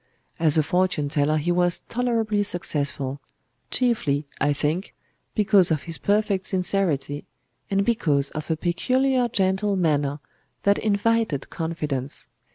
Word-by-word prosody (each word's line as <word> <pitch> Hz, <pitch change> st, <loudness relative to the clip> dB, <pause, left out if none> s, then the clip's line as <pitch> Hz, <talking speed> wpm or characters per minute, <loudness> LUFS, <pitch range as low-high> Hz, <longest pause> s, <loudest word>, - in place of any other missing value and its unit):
As 160 Hz, -2 st, +4 dB
a 155 Hz, -, +4 dB
fortune 180 Hz, -2 st, 0 dB
teller 150 Hz, +1 st, +1 dB
he 160 Hz, +3 st, 0 dB
was 175 Hz, 0 st, +2 dB
tolerably 230 Hz, -4 st, 0 dB
successful,—chiefly, 145 Hz, -, -2 dB
I 145 Hz, -, +2 dB
think, 155 Hz, +6 st, -2 dB, 0.4 s
because 205 Hz, -4 st, +4 dB
of 155 Hz, -3 st, 0 dB
his 165 Hz, -2 st, -5 dB
perfect 200 Hz, -2 st, +1 dB
sincerity, 180 Hz, -7 st, 0 dB, 0.5 s
and 195 Hz, 0 st, +1 dB
because 145 Hz, -12 st, +1 dB
of 155 Hz, +1 st, -6 dB
a 160 Hz, -, 0 dB
peculiar 255 Hz, -, +1 dB
gentle 195 Hz, -1 st, +1 dB
manner 145 Hz, -5 st, 0 dB, 0.4 s
that 200 Hz, 0 st, +3 dB
invited 215 Hz, -7 st, 0 dB
confidence. 150 Hz, -5 st, -4 dB
175 Hz, 120 wpm, -24 LUFS, 150-205 Hz, 0.5 s, As